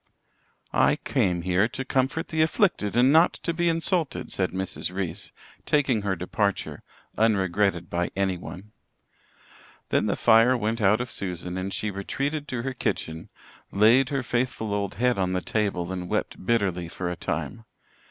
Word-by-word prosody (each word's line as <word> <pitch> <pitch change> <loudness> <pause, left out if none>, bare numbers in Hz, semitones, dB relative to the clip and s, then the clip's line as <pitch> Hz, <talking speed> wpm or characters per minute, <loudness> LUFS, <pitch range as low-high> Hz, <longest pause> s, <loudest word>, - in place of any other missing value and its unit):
"I - - +4
came 90 -3 0
here 95 +4 +2
to 135 +3 -5
comfort 135 +4 0
the 160 -1 0
afflicted 160 - +1
and 130 +3 +5
not 165 +2 +5
to 170 - -3
be 170 +1 +1
insulted," 165 -1 0
said 95 -2 0
Mrs. 95 -1 -4
Reese, 95 0 -4 0.4
taking 135 -7 +2
her 100 -2 -1
departure, 100 +3 -2 0.4
unregretted 95 -4 +2
by 85 0 -1
anyone. 95 0 -3 1.2
Then - - +2
the - - +1
fire 115 +3 +5
went 110 +1 -1
out 105 +3 +4
of 125 -2 -5
Susan 90 -3 -3
and 95 +1 -3
she 105 +1 -2
retreated 140 +10 -3
to 120 -2 -3
her 135 0 -3
kitchen, 80 -9 -3 0.4
laid 120 +6 +5
her 140 -2 -1
faithful 120 -4 -1
old 100 -1 -2
head 125 -1 +1
on 90 -1 0
the 90 - +1
table 95 -5 -1
and 90 -1 -5
wept - - -2
bitterly 95 -6 0
for 90 +1 -4
a - - -3
time. 115 +5 -4
105 Hz, 160 wpm, -26 LUFS, 95-125 Hz, 1.2 s, and